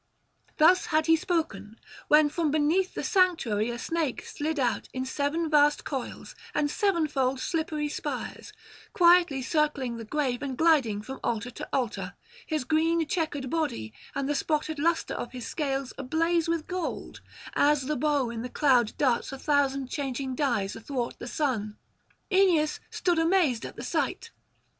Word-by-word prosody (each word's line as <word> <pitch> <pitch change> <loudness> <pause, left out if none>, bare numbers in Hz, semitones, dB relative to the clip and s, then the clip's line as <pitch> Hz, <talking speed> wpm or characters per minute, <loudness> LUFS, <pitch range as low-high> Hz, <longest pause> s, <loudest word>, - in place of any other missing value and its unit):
Thus 355 +4 +5
had 310 -1 +2
he 325 0 +5
spoken; 310 - -2 0.3
when 300 0 +6
from 320 0 0
beneath 310 +6 +1
the - - -3
sanctuary 320 - +2
a 240 - -4
snake 315 +1 -2
slid 305 +1 -3
out 245 -3 0
in 260 0 -3
seven 290 +5 -1
vast 295 -1 +4
coils 265 -4 -5 0.2
and 290 -1 +1
sevenfold 300 - +1
slippery 310 -1 -1
spires, 295 - -5 0.4
quietly 345 -7 +5
circling 280 -5 0
the 230 - -6
grave 255 +1 -1
and 270 -3 -4
gliding 265 -11 +3
from 265 +3 -7
altar 235 +1 -2
to - - -8
altar, 245 -4 -2 0.3
his 310 -4 -1
green 325 +4 +2
chequered 290 -6 -2
body 280 - -2 0.2
and 275 -1 -1
the 295 - +1
spotted 305 +1 -1
lustre 335 +2 +1
of 245 - -5
his 250 -2 -6
scales 275 -4 -2
ablaze 330 +5 +1
with 330 -2 -1
gold, 365 -2 -5 0.3
as 295 -1 +3
the 300 +3 -1
bow 285 -3 +1
in 230 -1 -5
the 250 - -5
cloud 250 -5 +3
darts 260 -2 +1
a 270 - -6
thousand 275 -1 +1
changing 265 -1 -3
dyes 235 -8 0
athwart 240 +1 -4
the 240 - -7
sun: 230 -7 -2 0.5
Aeneas 360 -6 +3
stood 350 -2 0
amazed 325 -8 +2
at - - -11
the - - -7
sight. 460 - -2
290 Hz, 155 wpm, -27 LUFS, 255-320 Hz, 0.5 s, when